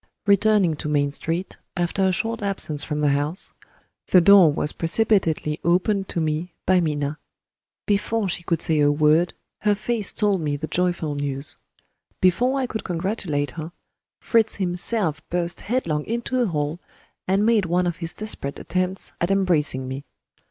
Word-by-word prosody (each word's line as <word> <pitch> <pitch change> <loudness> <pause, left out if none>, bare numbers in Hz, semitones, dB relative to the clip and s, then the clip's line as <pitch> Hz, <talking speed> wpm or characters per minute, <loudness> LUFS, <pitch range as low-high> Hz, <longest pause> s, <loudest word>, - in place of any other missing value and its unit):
Returning 200 -4 +3
to 150 - -4
Main 145 -1 +1
Street, 165 +5 -4 0.2
after 175 +3 0
a - - +2
short 225 +4 -1
absence 185 -7 0
from 150 -1 -3
the 150 - +3
house, 145 +6 -1 0.5
the 185 - +6
door 185 -2 +7
was 145 +1 -1
precipitately 165 -5 +1
opened 190 +3 +1
to - - -2
me 160 +2 -2
by 185 0 +4
Minna. 150 -2 -1 0.7
Before 210 +1 0
she 175 -1 -3
could 170 -1 0
say 160 -3 +2
a 145 0 +4
word, 155 +4 +3 0.2
her 210 -1 +2
face 215 0 -1
told 205 -4 +1
me 150 -2 -1
the 150 +2 -4
joyful 170 -2 -1
news. 145 0 -4 0.6
Before 245 +9 +2
I 265 - 0
could 220 -3 -5
congratulate 170 -5 -2
her, 165 +1 -7 0.5
Fritz 225 -2 +2
himself 180 -3 -1
burst 175 0 -2
headlong 170 -11 -1
into 235 +2 -2
the 245 -2 +2
hall, 150 -1 -2 0.5
and 195 +3 +2
made 225 -4 +3
one 180 +2 +1
of 175 -2 -2
his 165 -2 -3
desperate 210 -10 -3
attempts 185 +1 -2
at 170 - +1
embracing 160 -9 +2
me. 135 +2 -5
175 Hz, 160 wpm, -23 LUFS, 150-200 Hz, 0.7 s, door